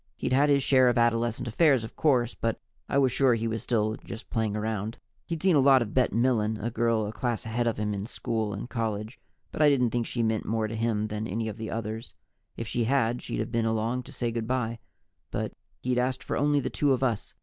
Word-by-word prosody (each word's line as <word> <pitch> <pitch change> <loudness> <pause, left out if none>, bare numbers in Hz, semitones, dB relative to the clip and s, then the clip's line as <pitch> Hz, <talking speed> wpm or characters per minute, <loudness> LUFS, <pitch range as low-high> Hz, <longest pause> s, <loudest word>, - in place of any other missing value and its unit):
He'd - - -1
had 140 +3 +4
his 140 -1 +4
share 130 -2 +5
of 120 - +1
adolescent 115 0 +1
affairs, 135 0 +3
of 110 - -8
course, 125 -6 +2
but 115 -1 -2 0.3
I - - +1
was 135 -2 +4
sure 130 -1 +3
he 115 0 -2
was 115 -1 -2
still 110 -2 0
just 115 - -9
playing 110 -3 0
around. 110 +1 -3 0.3
He'd 165 -2 -4
seen 190 -3 +4
a - - +6
lot 135 -2 +6
of 105 - -8
Bet 130 - +3
Milen, 115 -2 +1
a 115 +3 -3
girl 115 -1 +1
a 105 - -5
class 120 0 -2
ahead 120 +2 -1
of 115 - 0
him 105 0 -1
in 100 +1 -4
school 110 -3 -2
and 100 +4 -5
college, 110 0 -3 0.3
but - - -3
I 150 - +7
didn't 125 -5 +2
think 120 -2 -1
she 120 - -1
meant 110 -1 0
more 110 0 0
to 110 - -5
him 110 -1 0
than 105 +1 -3
any 110 +4 -2
of 105 -1 -5
the 110 -1 -5
others. 115 +1 -5 0.4
If 115 - -4
she 120 +1 0
had, 120 -1 +1
she'd - - -3
have - - -4
been 115 -1 +1
along 115 +3 0
to 130 - -12
say 120 -4 -2
good 115 -1 -3
by, 120 -2 -1 0.5
but - - -3 0.3
he'd 125 0 +1
asked 130 +1 -1
for - - -3
only 145 0 +2
the - - -3
two 145 -2 +2
of 130 - -1
us. 115 -5 -1
115 Hz, 245 wpm, -28 LUFS, 110-125 Hz, 0.5 s, I